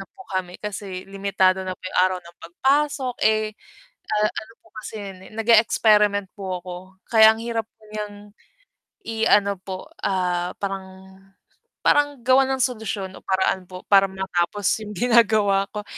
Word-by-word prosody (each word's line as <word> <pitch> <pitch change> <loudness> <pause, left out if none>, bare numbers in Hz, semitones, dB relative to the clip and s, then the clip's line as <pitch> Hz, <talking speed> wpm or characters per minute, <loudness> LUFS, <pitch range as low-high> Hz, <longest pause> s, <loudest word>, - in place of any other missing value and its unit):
na - - -10
po 380 - -12
kami 185 -1 -3
kasi 195 -3 -6
limitado 195 -1 +1
na 185 -1 -5
po - - -22
'yung 185 - +1
araw 185 0 +2
ng 170 0 -15
pagpasok, 265 - 0
eh, 215 0 +2 0.6
a - - -1 0.2
ano 220 - -7
po - - -22
kasi 215 +1 -8
'yun, 195 -3 -7
eh, - - -16
nag-e-experiment 215 -3 +3
po 185 -4 -5
ako 180 -1 -7 0.4
kaya 220 -1 +7
ang 225 - -8
hirap 230 -1 -3 0.2
niyang 205 -1 -7 0.7
i-ano 205 -3 +2
po, 185 0 -8 0.2
ah, 180 -2 -1
parang 190 -1 -7 0.7
parang 290 -1 +3
gawan 265 +1 +5
ng 255 - +3
solusyon 215 -5 -3
o - - -12
paraan 190 -1 0
po 185 0 -10
para 195 -1 +5
matapos 190 +1 -2 0.2
'yung 210 - -7
ginagawa 215 -3 +3
ko. 210 -1 -6
200 Hz, 155 wpm, -23 LUFS, 190-220 Hz, 0.7 s, kaya